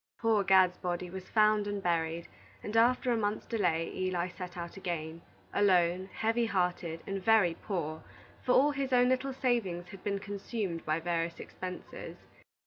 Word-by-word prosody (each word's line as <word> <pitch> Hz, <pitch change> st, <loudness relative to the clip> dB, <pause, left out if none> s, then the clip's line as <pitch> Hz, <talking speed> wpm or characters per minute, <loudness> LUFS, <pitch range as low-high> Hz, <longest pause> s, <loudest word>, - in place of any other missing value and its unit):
Poor 225 Hz, -3 st, +3 dB
Gad's 185 Hz, -1 st, +5 dB
body 175 Hz, 0 st, -3 dB
was 190 Hz, 0 st, -8 dB
found 215 Hz, -1 st, +4 dB
and 205 Hz, -1 st, -3 dB
buried, 165 Hz, -1 st, 0 dB, 0.4 s
and 210 Hz, -, -5 dB
after 245 Hz, +2 st, +4 dB
a -, -, +3 dB
month's 210 Hz, -1 st, -1 dB
delay, 175 Hz, -8 st, 0 dB
Eli 185 Hz, -1 st, -1 dB
set 180 Hz, 0 st, -8 dB
out 170 Hz, 0 st, -6 dB
again, 170 Hz, -4 st, -4 dB, 0.3 s
alone, 185 Hz, -2 st, +3 dB
heavy 230 Hz, +1 st, +1 dB
hearted, 180 Hz, -4 st, -1 dB
and 195 Hz, -1 st, -4 dB
very 210 Hz, -5 st, +5 dB
poor, 165 Hz, -4 st, -4 dB, 0.4 s
for 250 Hz, -, +2 dB
all 285 Hz, +3 st, +5 dB
his 275 Hz, -2 st, -2 dB
own 250 Hz, 0 st, +5 dB
little 260 Hz, +1 st, +1 dB
savings 205 Hz, -10 st, -1 dB
had 195 Hz, -1 st, -11 dB
been 200 Hz, -1 st, 0 dB
consumed 200 Hz, -3 st, -4 dB
by 155 Hz, +1 st, +1 dB
various 170 Hz, 0 st, -2 dB
expenses. 185 Hz, -1 st, -7 dB
190 Hz, 160 wpm, -31 LUFS, 175-220 Hz, 0.4 s, Gad's